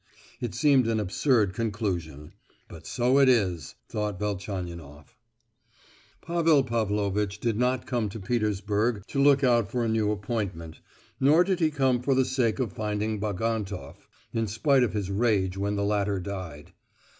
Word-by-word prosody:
"It 120 -3 -4
seems 140 -5 +4
an 115 -1 +1
absurd 105 0 +1
conclusion; 90 - -3 0.4
but 80 -1 -12
so 125 +9 +2
it 135 -1 +6
is!" 90 - +1
thought 105 -2 -3
Velchaninoff. 90 -7 -6 1.1
Pavel 165 -4 +3
Pavlovitch 105 -3 -1
did 115 -1 0
not 125 +2 0
come 120 -4 -1
to 110 - -7
Petersburg 105 0 -1
to 140 - 0
look 140 0 +5
out 120 -5 +3
for 120 +2 -1
a - - 0
new 110 -1 +1
appointment, 100 -6 -4 0.4
nor 150 +6 +5
did 185 -1 -1
he 160 -2 +3
come 130 -4 +1
for 130 +2 +1
the 130 0 +3
sake 125 -4 0
of 120 -8 -2
finding 105 0 -2
Bagantoff, 105 -6 -3 0.3
in 115 -1 0
spite 130 +6 +2
of 125 - +1
his 100 -2 -3
rage 100 -3 +1
when 100 +1 -1
the 100 0 -1
latter 100 -1 0
died. 90 -6 -7
105 Hz, 155 wpm, -27 LUFS, 100-125 Hz, 1.1 s, it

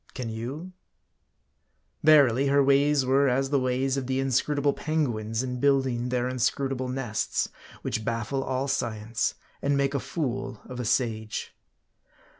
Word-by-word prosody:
Can 125 -3 -4
you? 135 +11 -6 1.3
Verily, 140 -4 +5
her 140 0 +4
ways 140 0 +3
were 135 +2 +3
as 135 +2 0
the 140 - +3
ways 130 +1 0
of 130 -2 -3
the 130 0 0
inscrutable 140 +2 +1
penguins 120 -8 -1
in 125 -1 -4
building 130 -3 +2
their 125 0 0
inscrutable 130 +1 -1
nests, 125 -4 -1 0.3
which 110 - -2
baffle 115 +4 -2
all 130 +1 -1
science, 115 -1 -1 0.3
and 140 0 +1
make 140 0 +1
a 140 - 0
fool 130 -5 -3
of 125 -1 -8
a 125 - -3
sage. 110 -2 -1
130 Hz, 140 wpm, -27 LUFS, 120-140 Hz, 1.3 s, Verily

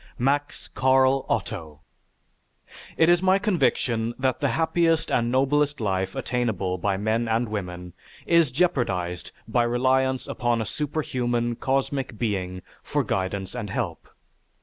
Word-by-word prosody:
MAX 140 +3 -1
CARL 130 +1 +3
OTTO 80 -8 -3 1.2
It 160 - +5
is 175 0 +4
my 190 0 +4
conviction 130 - 0
that 130 -1 0
the 145 - +1
happiest 165 +1 +1
and 120 0 +1
noblest 145 +2 +2
life 95 -3 -1
attainable 100 -7 -1
by 100 +2 0
men 110 +3 0
and 115 +2 +1
women 90 -4 -5 0.3
is 170 -3 +4
jeopardized 100 - 0 0.2
by 120 - +2
reliance 130 +2 +1
upon 120 -1 0
a 110 - -1
superhuman, 120 -4 -2
cosmic 135 -2 -1
being 95 -5 -2 0.2
for - - -1
guidance 95 0 -2
and 115 -4 -5
help. - - -4
120 Hz, 125 wpm, -25 LUFS, 100-135 Hz, 1.2 s, It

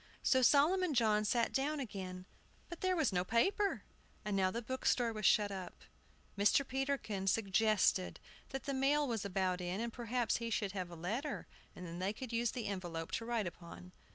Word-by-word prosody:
So 260 - +4
Solomon 310 +6 +4
John 215 -3 +3
sat 235 +2 +1
down 290 +3 0
again, 185 -7 -6 0.4
but 345 - -8
there 370 0 +2
was 310 - +1
no 180 -1 +2
paper. 390 - +1 0.4
And 210 -1 -1
now 190 -1 +3
the 235 +5 -4
bookstore 245 -1 0
was 215 -2 +1
shut 205 -1 +4
up. 185 -2 -7 0.5
Mr. 210 +7 +3
Peterkin 265 -8 -2
suggested 205 -1 +2 0.3
that 270 -1 -5
the 275 - -2
mail 280 +2 +2
was 225 -4 -2
about 185 -2 0
in, 180 +2 -3
and 230 0 -3
perhaps 240 -1 0
he 230 -1 -4
should 210 -3 -1
have 185 -3 -4
a 170 - -9
letter, 220 - -3 0.3
and 180 - -8
then 170 0 -6
they 190 +3 -1
could 245 +1 -7
use 235 0 +1
the 240 -1 -4
envelope 175 -4 -4
to 230 - -2
write 230 -3 0
upon. 175 +1 -9
220 Hz, 185 wpm, -35 LUFS, 190-260 Hz, 0.5 s, So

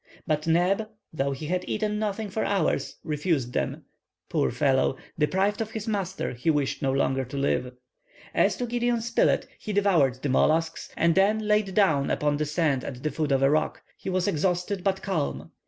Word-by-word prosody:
But 155 0 -1
Neb, 185 +6 +2 0.2
though 140 -2 0
he 135 +3 -5
had 180 +3 -1
eaten 210 -1 -1
nothing 210 -1 -2
for 220 - -1
hours, 195 -5 0
refused 150 -5 -1
them. - - -2 0.4
Poor - - +1
fellow! 135 -2 +2 0.2
deprived 190 +8 +1
of 220 - -2
his 220 -1 -6
master, 195 - -2
he 125 +7 -1
wished 145 -3 0
no 135 - +1
longer 135 0 +1
to 130 +3 -7
live. 130 -2 0 0.6
As - - +2
to 250 - -2
Gideon 240 0 0
Spilett, 235 +1 +2
he 210 - -5
devoured 165 - +2
the 145 - 0
mollusks, 160 +5 +1
and 170 0 +3
then 210 +3 +2
laid 210 -3 +2
down 155 -10 +3
upon 150 -1 +1
the 150 - 0
sand 150 -4 +1
at 130 -1 -7
the 155 - 0
foot 150 0 -1
of 135 0 +3
a 135 - +5
rock. 155 +1 0
He - - -6
was 185 0 0
exhausted, 180 +2 0
but 190 0 0
calm. 165 -7 -2
170 Hz, 190 wpm, -26 LUFS, 145-200 Hz, 0.6 s, a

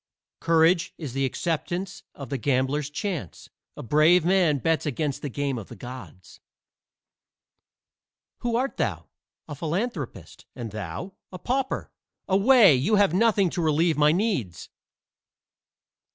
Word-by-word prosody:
Courage 165 +1 +2
is 145 -7 -6
the 135 0 0
acceptance 175 +6 -3
of 140 -4 -9
the 135 - -2
gambler's 135 +3 0
chance: 150 - -5 0.3
a - - -7
brave 155 +7 +4
man 175 -5 +3
bets 160 +4 0
against 145 0 -2
the 145 - -4
game 140 -1 -2
of 105 - -10
the - - -11
gods. 125 -7 -11 2.0
"Who 240 -1 -2
art 260 +3 -1
thou?" - - -2 0.4
"A 150 - -6
philanthropist. 165 - -5
And 115 -3 -6
thou?" 105 - -6 0.2
"A 185 - -7
pauper." 260 +6 -2 0.4
"Away! 200 - +6
you 140 +12 +2
have 200 -5 +3
nothing 200 -3 +3
to 180 - -2
relieve 160 +1 +2
my 150 +1 +4
needs." 165 - -2
160 Hz, 130 wpm, -25 LUFS, 135-190 Hz, 2.0 s, Away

